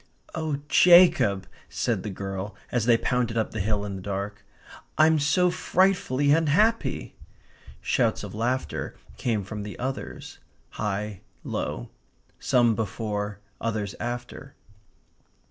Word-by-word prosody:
"Oh 155 -3 -2
Jacob," 165 - +6 0.2
said 115 -6 -1
the 105 - -5
girl, 95 +1 -5 0.2
as 120 -2 0
they 120 -1 +6
pounded 120 -1 0
up 110 - 0
the 110 - -4
hill 105 +1 0
in 100 -2 -4
the - - -8
dark, 100 +1 -4 0.5
"I'm 155 0 +5
so 180 +5 +3
frightfully 175 -7 +2
unhappy!" 165 +9 +2 0.7
Shouts - - +1
of - - -7
laughter 120 +4 -2 0.2
came 110 -5 -1
from 105 +2 -6
the 105 0 -7
others 130 +2 -5 0.3
high, 105 -1 -3 0.2
low; - - -4 0.5
some 120 -3 +3
before, 105 -1 -3 0.2
others 105 -3 -2
after. 125 +2 -6
115 Hz, 120 wpm, -26 LUFS, 105-140 Hz, 0.7 s, Jacob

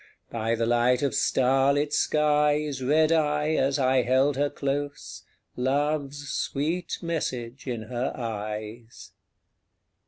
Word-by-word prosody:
By 115 0 -1
the 115 0 -1
light 120 +2 +2
of 140 - 0
starlit 135 +3 +2
skies 150 -2 +1
Read 155 +4 +3
I, 150 -1 +1
as 135 -1 +1
I 130 -1 +3
held 130 +3 +2
her 145 +1 +1
close, 140 - -4 0.3
Love's 145 +2 -1
sweet 160 +6 -2
message 130 -7 -4
in 120 -3 -3
her 125 +3 -3
eyes. 110 0 -6
135 Hz, 115 wpm, -26 LUFS, 120-150 Hz, 0.3 s, Read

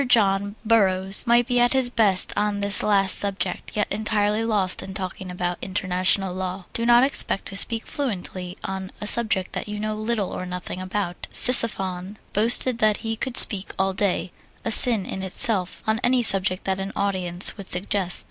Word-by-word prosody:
John 200 -3 0
Burroughs 195 -2 +1
might 240 +1 +2
be 245 0 -1
at 245 +1 +1
his 260 -2 +1
best 200 -6 +1
on 210 -1 -3
this 200 0 +3
last 195 -2 +2
subject, 195 0 -4
yet 210 - -1
entirely 210 +1 -2
lost 205 -5 +1
in 190 - -11
talking 185 -1 -7
about 180 0 -6
international 185 0 -1
law. 185 0 -7
Do 230 0 -4
not 240 +1 +4
expect 265 -7 -1
to 195 - -2
speak 225 +3 +4
fluently 185 -8 -7
on 190 0 -7
a - - -8
subject 210 -4 +1
that - - -7
you 210 0 -7
know 215 0 -5
little 215 -2 -4
or 185 - -8
nothing 180 0 -8
about. 185 -1 -6
Ctesiphon 195 -6 +3 0.2
boasted 235 +3 +2
that 215 -2 +1
he 225 0 -4
could 245 +2 -3
speak 200 -3 +4
all 190 0 -2
day 185 -2 -3 0.3
(a 225 - -2
sin 225 -3 +5
in 190 - -7
itself) 190 0 +3
on 220 +1 -2
any 245 0 +1
subject 190 -3 +4
that 190 0 -4
an 195 +1 -7
audience 185 -3 +2
would 200 -3 -12
suggest. 185 0 0
200 Hz, 180 wpm, -21 LUFS, 185-220 Hz, 0.3 s, sin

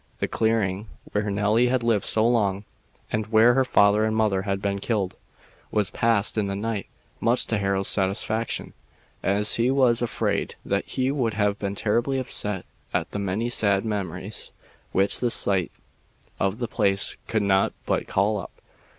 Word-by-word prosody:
The - - 0
clearing 110 -3 0 0.2
where 105 0 -1
Nelly 105 +4 +2
had 125 -1 0
lived 115 -4 +1
so 110 +1 +2
long, 100 -4 +1 0.5
and 110 -1 -1
where 110 +2 +5
her 130 +1 +3
father 105 -4 +3
and 110 0 0
mother 105 -4 +1
had 100 0 -2
been 100 0 -2
killed, 100 -3 -2 0.6
was 105 -3 0
passed 115 -1 +1
in 100 - 0
the 100 - -3
night, 105 0 -3 0.3
much 120 +2 +2
to 115 - 0
Harold's 95 -1 0
satisfaction, 105 +3 -1 0.5
as 100 +2 +3
he 120 +2 +2
was 130 -3 +3
afraid 120 - -1
that 100 0 -2
she 130 0 0
would 120 -7 -1
have 105 -1 0
been 100 -1 -3
terribly 120 +6 0
upset 105 -7 -3 0.3
at - - -1
the 105 - -4
many 100 +4 -1
sad 100 -4 +3
memories 100 -6 -4 0.4
which 95 +1 +4
the 120 - +1
sight 95 -6 +2 0.7
of 95 +2 0
the 120 -1 -3
place 100 -4 0
could 110 -2 0
not 95 -1 +2
but - - -1
call 105 +2 +1
up. - - -9
105 Hz, 170 wpm, -24 LUFS, 100-115 Hz, 0.7 s, where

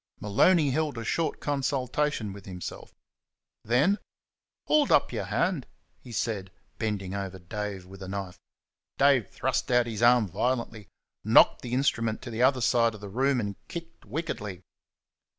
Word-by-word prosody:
Maloney 145 - +3
held 150 -1 -1
a 115 - -4
short 165 +6 -1
consultation 140 -4 -1
with 100 -1 -12
himself. 90 -2 -7 0.7
Then 140 - +3 0.7
"Hould 300 -1 +3
up - - +4
yer - - -2
hand!" 175 -9 0 0.3
he 125 - -12
said, 105 -4 -2 0.3
bending 100 -4 -2
over 100 -1 -4
Dave 100 +1 -5
with 95 +1 -13
a 95 - -6
knife. 95 -2 -5 0.6
Dave 135 -8 +4
thrust 125 -3 -1
out 120 -1 +4
his 115 -2 -5
arm 120 -2 +5
violently, 115 +1 -2 0.4
knocked - - +6
the 120 - -5
instrument 115 -4 +1
to 120 - -6
the 115 +1 -3
other 130 0 +4
side 115 -1 +3
of 105 - -12
the 100 - -7
room, 130 +5 +1
and 100 -3 -3
kicked 170 -1 -8
wickedly. 105 - -5
115 Hz, 150 wpm, -28 LUFS, 100-135 Hz, 0.7 s, knocked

